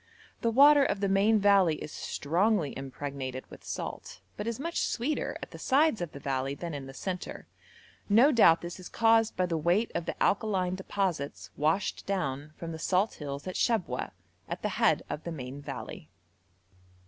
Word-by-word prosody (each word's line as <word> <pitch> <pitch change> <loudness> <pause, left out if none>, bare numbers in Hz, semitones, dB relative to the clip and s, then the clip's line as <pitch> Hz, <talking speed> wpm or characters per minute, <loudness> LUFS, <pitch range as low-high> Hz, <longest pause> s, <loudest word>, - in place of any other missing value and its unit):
The 230 - +2
water 285 +4 +7
of 205 - 0
the 200 - +1
main 200 +3 +4
valley 200 -5 +4
is 150 - -8
strongly 175 +1 0
impregnated 135 -1 -5
with - - -12
salt, - - -6 0.2
but 210 - -5
is 230 0 -2
much 335 +4 -2
sweeter 270 +6 -1
at - - -8
the - - -10
sides 280 - +3
of 175 - -3
the 140 - -9
valley 135 0 -2
than 170 +1 -6
in 140 -2 -6
the 135 - -9
centre. 180 +2 -5 0.6
No 235 +8 +6
doubt 195 - +6
this 175 +1 -7
is 180 - -9
caused 225 -1 +3
by 185 - +2
the 165 -2 -1
weight 175 +8 +2
of 170 - -3
the - - -3
alkaline 190 -3 +1
deposits 185 -6 -3
washed 160 +7 0
down 150 -7 -2
from 165 -1 -6
the 160 - -6
salt 190 +6 +1
hills 140 -1 -5
at 185 - -4
Shabwa, 195 - 0 0.4
at - - -5
the - - +1
head - - +2
of 150 - -5
the 170 - -5
main 135 -2 -7
valley. - - -7
180 Hz, 185 wpm, -29 LUFS, 145-215 Hz, 0.6 s, water